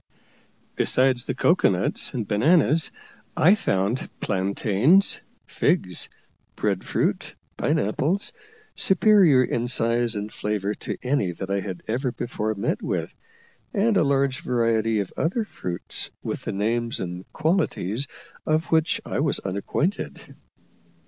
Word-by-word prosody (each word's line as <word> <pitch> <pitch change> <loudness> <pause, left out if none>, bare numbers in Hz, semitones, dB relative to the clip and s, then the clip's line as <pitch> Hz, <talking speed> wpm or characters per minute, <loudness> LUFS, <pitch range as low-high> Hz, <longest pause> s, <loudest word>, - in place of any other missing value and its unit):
Besides 130 -1 +2
the 130 - -2
cocoa 170 +7 +3
nuts 95 0 0
and 115 -5 -2
bananas, 155 +7 +3 0.5
I 180 +6 +6
found 105 - 0
plantains, 105 - +2 0.2
figs, 145 - 0 0.5
bread 100 -3 -1
fruit, - - -1 0.2
pine - - +1
apples, 150 - 0 0.4
superior 190 -9 +5
in 120 -1 -1
size 120 -1 +2
and 105 +1 -5
flavour 105 -1 -2
to - - -5
any 125 -9 0
that 95 +3 -6
I 100 - +1
had 95 -2 -6
ever 125 +3 -1
before 110 -3 -3
met 100 +4 -2
with, - - -3 0.6
and 215 +2 +2
a - - +4
large 140 -2 +1
variety 115 -2 +1
of 95 - -7
other 205 +8 0
fruits 90 - -3
with - - -4
the - - -2
names 115 +4 -1
and 90 0 -6
qualities 150 - 0 0.4
of 155 +1 0
which 160 0 +2
I - - -2
was - - +1
unacquainted. 100 - -3
120 Hz, 130 wpm, -24 LUFS, 100-155 Hz, 0.6 s, I